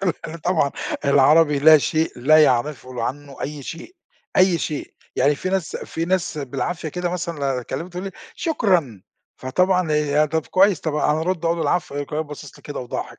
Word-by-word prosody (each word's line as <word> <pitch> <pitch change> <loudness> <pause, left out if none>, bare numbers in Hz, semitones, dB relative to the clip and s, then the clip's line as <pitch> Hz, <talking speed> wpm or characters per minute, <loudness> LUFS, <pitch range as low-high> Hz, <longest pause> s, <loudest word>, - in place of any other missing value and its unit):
عارف 180 -4 +1
هنا 165 - -7
طبعًا 160 -4 +1 0.3
العربي 145 +2 +5
لا 155 +1 +8
شيء، 160 +3 0
لا 155 +5 +5
يعرفوا 130 0 0
ل - - -7
عنّه 140 +3 -5
أي 145 -1 -5
شيء، 170 - -9 0.4
أي 185 -2 +4
شيء. 150 -1 -4 0.2
يعني 145 +3 +3
في 185 - -4
ناس 190 -4 -1
في 165 - -4
ناس 175 -3 -1
بالعافية 155 +4 -3
كده 175 +2 -3
مثلًا 170 -3 -4
لو 140 - -3 0.2
أكلّمهم، 165 +8 -5
تقُول 180 +1 -6
لي: 195 - -4 0.2
"شكرًا" 180 - 0 0.3
فطبعًا 180 +5 +1
هي 150 0 +2
طَب 160 0 -2
كويّس، 190 -2 +3
طبعًا 150 -1 0
أنا 155 - -1
أرُد 170 0 -2
أقُول 165 0 +1
العفو 170 -5 -1
يقوم 145 - -2
كمان 155 +1 -2
باصص 150 -1 -10
لي - - -19
كده 145 - -6
وضاحك 125 - -6
155 Hz, 190 wpm, -22 LUFS, 145-175 Hz, 0.4 s, لا